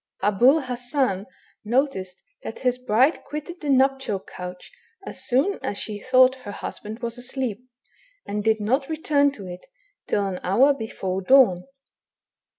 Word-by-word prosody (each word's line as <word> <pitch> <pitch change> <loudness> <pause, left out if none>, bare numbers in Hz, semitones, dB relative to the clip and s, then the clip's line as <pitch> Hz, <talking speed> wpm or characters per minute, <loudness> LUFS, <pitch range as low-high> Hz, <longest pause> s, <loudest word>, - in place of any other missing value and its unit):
Ahul 245 +9 +4
Hassan 245 -5 -1 0.4
noticed 215 -6 -1 0.2
that - - -7
his 250 -1 0
hride 255 +9 +3
quitted 305 +4 -7
the 295 - -3
nuptial 265 -6 +2
couch 180 -1 -9 0.3
as - - -6
soon 280 +11 +2
as 200 - -2
she 210 0 -4
thought 255 +3 +5
her 225 -6 -8
hushand 215 +3 -7
was 235 +1 -3
asleep, 250 -2 -4 0.6
and 210 0 -3
did 220 0 +2
not 260 +7 0
return 295 -3 +2
to 200 -7 -10
it, 180 0 -9 0.4
till 205 -1 +1
an 190 -2 -3
hour 250 +10 +4
hefore 195 -7 -4
dawn. 195 -5 +5
245 Hz, 145 wpm, -24 LUFS, 205-270 Hz, 0.6 s, thought